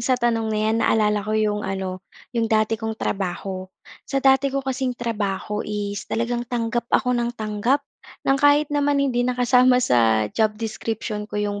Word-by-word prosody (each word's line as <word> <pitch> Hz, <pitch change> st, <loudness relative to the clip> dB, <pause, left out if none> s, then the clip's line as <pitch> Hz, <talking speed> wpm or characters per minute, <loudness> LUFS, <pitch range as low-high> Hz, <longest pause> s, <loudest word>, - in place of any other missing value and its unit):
sa 250 Hz, +2 st, +2 dB
tanong 230 Hz, -2 st, 0 dB
na 215 Hz, -, -1 dB
'yan 220 Hz, +1 st, +2 dB
naalala 210 Hz, -2 st, +2 dB
ko 215 Hz, +2 st, -2 dB
'yong 210 Hz, -1 st, +1 dB
ano 190 Hz, -2 st, -4 dB, 0.3 s
'yong 230 Hz, -2 st, 0 dB
dati 220 Hz, 0 st, +1 dB
kong 220 Hz, 0 st, -3 dB
trabaho. 190 Hz, -1 st, -3 dB, 0.4 s
Sa 275 Hz, -, -2 dB
dati 270 Hz, 0 st, +4 dB
ko 275 Hz, 0 st, -3 dB
kasing 260 Hz, -1 st, -2 dB
trabaho 210 Hz, -3 st, -2 dB
is 205 Hz, -1 st, -4 dB
talagang 240 Hz, +1 st, -2 dB
tanggap 235 Hz, -1 st, -2 dB
ako 250 Hz, -1 st, +2 dB
ng 240 Hz, 0 st, -1 dB
tanggap 220 Hz, +6 st, 0 dB, 0.4 s
ng 270 Hz, 0 st, +3 dB
kahit 290 Hz, 0 st, +4 dB
naman 290 Hz, 0 st, +2 dB
hindi 270 Hz, -3 st, +1 dB
na 250 Hz, -, -1 dB
kasama 250 Hz, 0 st, +4 dB
sa 115 Hz, -, +3 dB
job 215 Hz, -1 st, +1 dB
description 220 Hz, -1 st, -4 dB
ko 210 Hz, -, -6 dB
'yong 205 Hz, -1 st, -2 dB
225 Hz, 175 wpm, -23 LUFS, 210-250 Hz, 0.4 s, dati